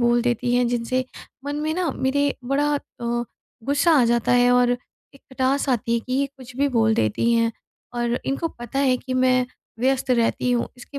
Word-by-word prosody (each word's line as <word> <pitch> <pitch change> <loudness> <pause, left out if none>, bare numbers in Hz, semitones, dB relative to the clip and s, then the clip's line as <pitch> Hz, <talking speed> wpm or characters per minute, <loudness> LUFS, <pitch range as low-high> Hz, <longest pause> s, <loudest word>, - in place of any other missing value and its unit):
बोल 240 0 +3
देती 245 0 0
हैं 245 0 +3
जिनसे 245 +2 -1 0.4
मन 285 +1 -3
में 310 +1 -1
ना 350 -3 0
मेरे 285 +2 +1
बड़ा 275 +3 +1
अ, 240 -4 -3 0.4
गुस्सा 285 +5 +3
आ - - +4
जाता 235 0 +2
है 245 0 +5
और 245 0 +4 0.4
एक 275 - -17
खटास 265 +2 0
आती 235 -2 +1
है 235 - +1
कि 255 +3 -7
ये 275 +2 +1
कुछ 255 -2 -12
भी 285 +1 +2
बोल 220 0 +3
देती 110 - +1
हैं 230 0 +2 0.4
और 240 0 0
इनको 275 +5 -1
पता 240 -1 -6
है 260 -2 +3
कि 260 0 -6
मैं 255 -1 +3 0.3
व्यस्त 265 +1 +1
रहती 240 +1 +1
हूँ। 240 - 0
इसके 265 +3 -9
250 Hz, 195 wpm, -23 LUFS, 240-275 Hz, 0.4 s, है